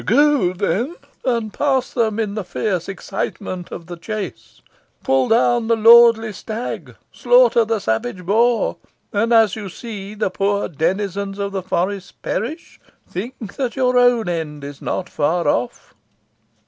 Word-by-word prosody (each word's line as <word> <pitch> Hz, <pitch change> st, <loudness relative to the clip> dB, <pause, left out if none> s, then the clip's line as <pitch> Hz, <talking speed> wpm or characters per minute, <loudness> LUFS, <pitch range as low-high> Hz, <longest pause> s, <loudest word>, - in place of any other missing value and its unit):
Go, 280 Hz, -6 st, +3 dB
then, 200 Hz, -, -1 dB, 0.3 s
and 230 Hz, -4 st, -1 dB
pass 265 Hz, -3 st, 0 dB
them 225 Hz, -3 st, 0 dB
in 210 Hz, -3 st, -1 dB
the 215 Hz, -1 st, -3 dB
fierce 180 Hz, 0 st, -2 dB
excitement 190 Hz, -2 st, -5 dB
of 170 Hz, -, -7 dB
the 175 Hz, 0 st, -8 dB
chase. 170 Hz, -, -6 dB, 0.4 s
Pull 135 Hz, -1 st, +2 dB
down 235 Hz, 0 st, +3 dB
the 230 Hz, -, +3 dB
lordly 225 Hz, -1 st, +6 dB
stag 220 Hz, +4 st, -6 dB, 0.2 s
slaughter -, -, +4 dB
the 225 Hz, 0 st, 0 dB
savage 120 Hz, -, -2 dB
boar; 230 Hz, +5 st, +2 dB, 0.4 s
and, 225 Hz, +3 st, +1 dB
as 225 Hz, -4 st, +5 dB
you 205 Hz, -3 st, -6 dB
see 205 Hz, 0 st, -8 dB
the 210 Hz, -3 st, -1 dB
poor 200 Hz, +1 st, 0 dB
denizens 195 Hz, +4 st, -2 dB
of 200 Hz, 0 st, -3 dB
the 195 Hz, -1 st, -3 dB
forest 185 Hz, +2 st, -3 dB
perish, 280 Hz, -, -4 dB, 0.3 s
think 220 Hz, +1 st, -7 dB
that 255 Hz, -4 st, -2 dB
your 255 Hz, -2 st, +1 dB
own 245 Hz, -4 st, +4 dB
end 155 Hz, -4 st, -4 dB
is 140 Hz, 0 st, -8 dB
not 180 Hz, -, -3 dB
far 160 Hz, +1 st, 0 dB
off. 120 Hz, -3 st, -1 dB
205 Hz, 150 wpm, -20 LUFS, 180-235 Hz, 0.4 s, lordly